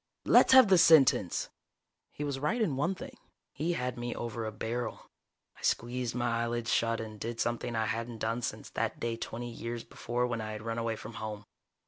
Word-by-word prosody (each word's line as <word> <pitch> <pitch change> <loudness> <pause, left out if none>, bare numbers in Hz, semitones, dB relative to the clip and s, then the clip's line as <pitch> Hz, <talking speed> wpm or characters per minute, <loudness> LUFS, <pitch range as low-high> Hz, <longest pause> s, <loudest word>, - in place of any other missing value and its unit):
"Let's - - +6
have 260 -5 +9
the 185 -2 +6
sentence!" 160 -5 +5 0.6
He 150 - -6
was 140 -2 -2
right 150 - 0
in 175 - +1
one 170 +8 0
thing. 260 +6 -9 0.4
He 165 +4 -1
had 125 -5 -3
me 120 0 -3
over 115 -1 -4
a 110 - -3
barrel. 115 +3 -4 0.4
I - - -17
squeezed 120 0 -1
my 120 -1 0
eyelids 120 0 -1
shut 115 0 +1
and 110 -1 -7
did 115 +2 -4
something 120 0 -1
I 110 0 +1
hadn't 115 +2 -3
done 115 +2 -1
since - - -5
that - - -2
day 115 -1 -1
twenty 120 +1 -5
years 115 0 -5
before 120 +1 -2
when 120 -2 -2
I 110 0 -4
had 105 0 -7
run 115 0 -2
away 115 -1 -1
from 110 +1 -9
home. 105 -1 -5
120 Hz, 200 wpm, -31 LUFS, 115-125 Hz, 0.6 s, have